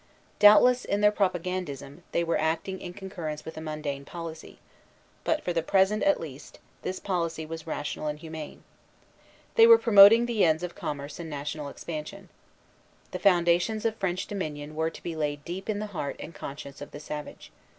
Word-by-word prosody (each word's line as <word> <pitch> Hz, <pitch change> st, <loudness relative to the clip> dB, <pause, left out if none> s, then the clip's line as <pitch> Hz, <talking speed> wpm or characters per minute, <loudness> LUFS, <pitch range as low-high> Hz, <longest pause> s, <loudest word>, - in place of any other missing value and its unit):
Doubtless, 245 Hz, +4 st, +7 dB
in 200 Hz, +1 st, -1 dB
their 210 Hz, 0 st, +6 dB
propagandism, 180 Hz, -7 st, -2 dB
they 170 Hz, -, +1 dB
were 170 Hz, 0 st, 0 dB
acting 165 Hz, +4 st, -1 dB
in 175 Hz, -, -6 dB
concurrence 170 Hz, -6 st, -6 dB
with 160 Hz, -, -7 dB
a 160 Hz, -, -6 dB
mundane 150 Hz, -3 st, -4 dB
policy; 165 Hz, +1 st, -8 dB, 0.7 s
but, 315 Hz, -1 st, 0 dB
for 175 Hz, -, -1 dB
the 165 Hz, -, +1 dB
present 195 Hz, +5 st, +2 dB
at 295 Hz, 0 st, +3 dB
least, 145 Hz, -2 st, -9 dB, 0.2 s
this 185 Hz, 0 st, -4 dB
policy 170 Hz, -4 st, -2 dB
was 160 Hz, 0 st, -8 dB
rational 150 Hz, 0 st, -3 dB
and 150 Hz, 0 st, -2 dB
humane. 160 Hz, -1 st, -8 dB, 0.9 s
They 455 Hz, -1 st, +7 dB
were 460 Hz, -1 st, +10 dB
promoting 225 Hz, -, +8 dB
the 235 Hz, -3 st, +1 dB
ends 160 Hz, 0 st, +3 dB
of 175 Hz, -1 st, -4 dB
commerce 145 Hz, +1 st, -5 dB
and 165 Hz, -1 st, -6 dB
national 145 Hz, 0 st, -4 dB
expansion. 170 Hz, +6 st, -7 dB, 0.8 s
The -, -, -4 dB
foundations 180 Hz, +3 st, +3 dB
of 225 Hz, -1 st, +1 dB
French 185 Hz, -2 st, -1 dB
dominion 155 Hz, -6 st, -5 dB
were 160 Hz, +1 st, 0 dB
to -, -, -13 dB
be 170 Hz, -, -4 dB
laid 145 Hz, -2 st, -3 dB
deep 185 Hz, +4 st, -6 dB
in 210 Hz, -, 0 dB
the 210 Hz, -, -3 dB
heart 145 Hz, -5 st, -3 dB
and 165 Hz, -, -8 dB
conscience 140 Hz, -1 st, -8 dB
of 145 Hz, -, -7 dB
the 145 Hz, -, -9 dB
savage. 150 Hz, 0 st, -8 dB
170 Hz, 180 wpm, -27 LUFS, 150-195 Hz, 0.9 s, were